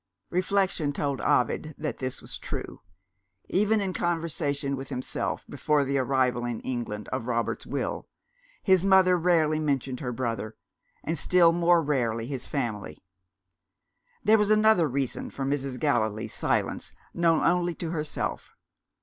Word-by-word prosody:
Reflection 185 Hz, -4 st, +1 dB
told 140 Hz, -2 st, -2 dB
Ovid 150 Hz, +5 st, +1 dB
that 150 Hz, -6 st, -4 dB
this 130 Hz, -1 st, -4 dB
was -, -, -6 dB
true. -, -, -6 dB, 0.7 s
Even 210 Hz, +3 st, +3 dB
in 195 Hz, -2 st, -2 dB
conversation 160 Hz, -5 st, -1 dB
with 135 Hz, 0 st, -7 dB
himself 130 Hz, -2 st, -3 dB
(before 150 Hz, -1 st, +1 dB
the 140 Hz, 0 st, 0 dB
arrival 130 Hz, -2 st, +1 dB
in 120 Hz, -2 st, -3 dB
England 120 Hz, -5 st, -4 dB
of 130 Hz, -2 st, -3 dB
Robert's 115 Hz, -1 st, -1 dB
Will), -, -, -3 dB, 0.6 s
his 190 Hz, -3 st, +4 dB
mother 190 Hz, -2 st, +5 dB
rarely 165 Hz, -3 st, +2 dB
mentioned 135 Hz, -4 st, -1 dB
her 125 Hz, -4 st, -3 dB
brother 115 Hz, -3 st, -3 dB, 0.5 s
and 165 Hz, +2 st, -1 dB
still 175 Hz, -2 st, +5 dB
more 170 Hz, 0 st, +3 dB
rarely 120 Hz, -6 st, 0 dB
his 130 Hz, -1 st, -5 dB
family. 105 Hz, -, -3 dB, 1.3 s
There 220 Hz, +1 st, +5 dB
was 210 Hz, 0 st, +2 dB
another 215 Hz, -5 st, +5 dB
reason 135 Hz, 0 st, -2 dB
for 135 Hz, -, -4 dB
Mrs. 135 Hz, -2 st, -2 dB
Gallilee's 110 Hz, -2 st, 0 dB
silence, -, -, -1 dB, 0.2 s
known 165 Hz, -2 st, +3 dB
only 175 Hz, 0 st, +2 dB
to 165 Hz, -2 st, -4 dB
herself. 150 Hz, -2 st, -3 dB
145 Hz, 140 wpm, -27 LUFS, 125-175 Hz, 1.3 s, mother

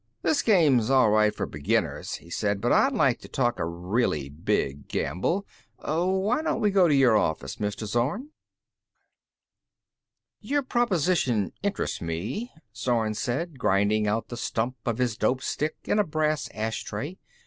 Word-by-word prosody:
"This 295 Hz, -, +2 dB
game's 145 Hz, -, +4 dB
all 130 Hz, -5 st, +5 dB
right 105 Hz, 0 st, +4 dB
for -, -, -3 dB
beginners," 75 Hz, -1 st, -1 dB
he 85 Hz, -, -13 dB
said. 100 Hz, 0 st, 0 dB
"But 120 Hz, +4 st, 0 dB
I'd 270 Hz, -, +4 dB
like 135 Hz, -, +2 dB
to -, -, -12 dB
talk 120 Hz, -2 st, 0 dB
a -, -, 0 dB
really 85 Hz, -, -1 dB
big 70 Hz, -1 st, -2 dB
gamble. 95 Hz, -, -1 dB, 0.3 s
Why 190 Hz, -, 0 dB
don't 320 Hz, -, -1 dB
we 210 Hz, -, +2 dB
go 190 Hz, -3 st, +5 dB
to 150 Hz, -, +3 dB
your 130 Hz, -5 st, +5 dB
office, 80 Hz, -7 st, 0 dB
Mr. 105 Hz, +1 st, -3 dB
Zorn?" 130 Hz, -, -1 dB, 2.1 s
"Your 285 Hz, 0 st, -1 dB
proposition 175 Hz, -, +1 dB
interests 200 Hz, 0 st, -2 dB
me," 90 Hz, -, -4 dB, 0.2 s
Zorn 115 Hz, -2 st, 0 dB
said, 135 Hz, +7 st, -3 dB
grinding 105 Hz, 0 st, +2 dB
out 110 Hz, +2 st, -1 dB
the 120 Hz, -, -6 dB
stump 120 Hz, +1 st, -2 dB
of 115 Hz, -2 st, 0 dB
his 125 Hz, -4 st, 0 dB
dope 130 Hz, +2 st, 0 dB
stick 155 Hz, +1 st, -2 dB
in 210 Hz, -, +1 dB
a -, -, +5 dB
brass 155 Hz, -3 st, -1 dB
ashtray. 110 Hz, -, -4 dB
120 Hz, 150 wpm, -26 LUFS, 105-175 Hz, 2.1 s, all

